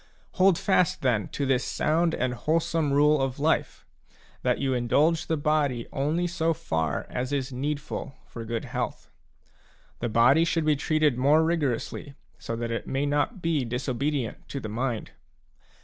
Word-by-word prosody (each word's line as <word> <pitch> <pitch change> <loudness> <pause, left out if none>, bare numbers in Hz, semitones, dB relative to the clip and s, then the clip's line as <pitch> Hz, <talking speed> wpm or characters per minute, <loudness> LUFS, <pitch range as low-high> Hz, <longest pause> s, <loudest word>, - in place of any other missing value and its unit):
" - - -35
Hold 185 -2 +5
fast, 180 -6 +1
then, 115 -6 +1
to 140 - -3
this 135 -1 +2
sound 165 +2 +1
and 125 0 -1
wholesome 155 +3 0
rule 150 +1 +4
of 135 -1 -1
life; 155 +3 0 0.6
that - - +1
you 135 -1 0
indulge 150 +7 +2
the 160 - 0
body 145 -5 +1
only 155 +6 0
so 165 -1 0
far 80 - -2
as 125 +2 -3
is 135 -2 -2
needful 140 +1 -4
for 115 - -8
good 115 0 -3
health. - - -4 0.9
The 120 - -2
body 125 +8 +5
should 165 -2 0
be 155 -1 +4
treated 150 -2 +1
more 150 +5 +5
rigorously, 145 -3 -2 0.3
that 115 0 -3
it 115 - -3
may 135 +2 -1
not 145 +8 -1
be 165 -5 +1
dis 125 +3 -4
obedient 135 -1 -2
to 140 - -4
the 110 - -6
mind. 120 +1 -3
140 Hz, 165 wpm, -26 LUFS, 125-155 Hz, 0.9 s, Hold